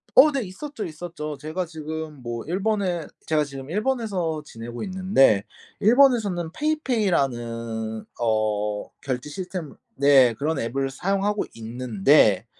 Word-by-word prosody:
어 290 +3 +8
네. 270 -3 0
있었죠, 220 +7 -6
있었죠. 155 -2 -6
제가 160 +4 -3
지금 160 -2 -6
뭐 120 -1 -4
일본에 190 -2 0 0.2
제가 155 -1 +2
지금 135 0 -8
일본에서 200 - -1
지내고 120 -2 -8
있는데 185 - +3 0.4
일본에서는 215 -8 +4
페이페이라는 120 - -1 0.2
어 105 -2 0
결제 130 +1 -3
시스템 180 -2 -6 0.2
네. 135 -4 +6
그런 155 +7 -1
앱을 135 +4 -1
사용하고 195 +7 0
있는데 115 -2 +3
155 Hz, 280 characters per minute, -24 LUFS, 120-195 Hz, 0.4 s, 어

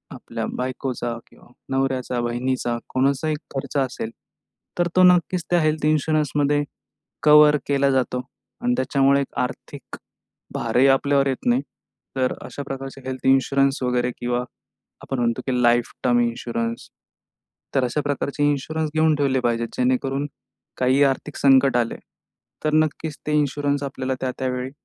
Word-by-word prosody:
आपल्या - - -5
बायकोचा 125 -2 -3
किंवा - - -20 0.3
नवऱ्याचा, 130 -2 -1
बहिणीचा 120 0 -1
कोणाचाही 140 +4 +1 0.2
खर्च 135 +1 -3
असेल, 130 -4 -2 0.7
तर 175 - +3
तो 185 - +6
नक्कीच 180 -1 +4
त्या 175 -1 +3
हेल्थ 155 -1 0
इन्शुरन्समध्ये 150 -1 +1 0.6
कव्हर 150 0 +7
केला 140 -1 +2
जातो 125 -1 0 0.4
आणि 245 0 +1
त्याच्यामुळे 140 +1 +3
एक - - -6
आर्थिक 125 - -5 0.6
भारही 130 +2 +2
आपल्यावर 140 +1 +3
येत 135 -2 -2
नाही. 125 +3 +3 0.5
तर 130 -1 +1
अशा 140 - -7
प्रकारच्या 135 0 -7
हेल्थ 130 -1 -5
इन्शुरन्स 135 0 +3
वगैरे 125 0 +1
किंवा 120 0 -1 0.6
आपण 135 - -4
म्हणतो 120 +1 0
की 125 -1 0
लाइफ 120 0 +3
टर्म 120 -1 +4
इन्शुरन्स 115 0 -2 0.9
तर 135 -2 +3
अशा 125 +5 -1
प्रकारचे 145 +1 -1
इन्शुरन्स 155 +2 -2
घेऊन 155 0 +3
ठेवले 135 -2 +1
पाहिजेत. 115 -1 0
जेणेकरून 135 +2 0 0.5
काही 130 +2 +3
आर्थिक 140 +2 -1
संकट 135 -2 +4
आले, 120 -1 0 0.7
तर 155 - +1
नक्कीच 155 0 0
ते 150 - -1
इन्शुरन्स 145 0 0
आपल्याला 130 -1 -3
त्या-त्या 130 0 -2
वेळी 125 +1 -4
135 Hz, 140 wpm, -23 LUFS, 125-145 Hz, 0.9 s, कव्हर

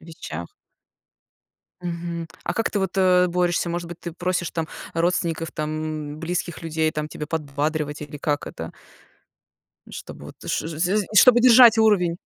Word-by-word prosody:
вещах? 85 - -8 1.3
Мгм. 170 -1 -4 0.2
А 175 - -3
как 225 - 0
ты 205 - -1
вот, 190 0 -2
э-э, 180 -1 +4
борешься? 175 0 0
Может 175 0 -3
быть, 175 0 -9
ты 170 - -6
просишь 175 0 -2
там 165 -2 -3 0.3
родственников, 165 -1 0
там 155 -1 -4
близких 170 0 -3
людей 160 -1 0
там 150 -1 -3
тебе 150 0 -7
подбадривать, 150 0 -2
или 145 0 -8
как 145 0 -2
это 80 0 -7 1.2
чтобы - - -9
вот - - -11 0.2
ш - - +1
ш 155 -2 -7
з 185 +3 +2
з 205 - -1
чтобы 240 +3 +7
держать 240 -2 +8
уровень? 180 -6 +3
170 Hz, 155 wpm, -23 LUFS, 155-180 Hz, 1.3 s, держать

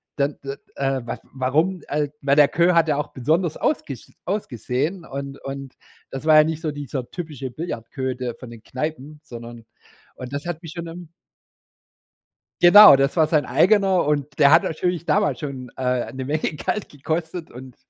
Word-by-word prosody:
dann, 140 0 -1
äh, 135 0 -5 0.2
äh, 135 -2 -1
waf - - -4
warum, 155 +8 0
äh, 150 0 0
weil 140 -1 +2
der 145 - +7
Queue 175 +3 +2
hat 165 -1 +4
ja 150 - +2
auch 150 - -3
besonders 155 +6 0
ausgesch 140 - -3
ausgesehen 165 - -3
und 140 -1 -7
und 135 -1 -7 0.4
das 135 +2 -6
war 155 -1 +6
ja 155 - +8
nicht 160 0 -3
so 155 -3 -2
dieser 140 -3 -6
typische 150 -7 -6
Billardqueue, 130 -4 -4
der 125 -2 -4
von 125 0 -11
den 115 -1 -13
Kneipen, 150 +1 -5
sondern 120 -1 -10 0.5
und 130 0 -8
das 145 +3 -4
hat 175 0 -5
mich 165 - -8
schon 170 -1 -6
im 170 0 -10 1.5
Genau, 205 -2 +10
das 135 +4 0
war 160 -2 +4
sein 155 -2 +2
eigener 195 -2 +3
und 145 -1 -1
der 140 - +7
hat 170 +5 +6
natürlich 175 0 -2
damals 150 -3 +1
schon, 135 -4 -6
äh, 125 -1 -1
'ne 130 0 -5
Menge 150 +4 -1
Geld 205 +7 -3
gekostet 160 +4 -4
und, 125 0 -11
145 Hz, 180 wpm, -22 LUFS, 130-165 Hz, 1.5 s, Genau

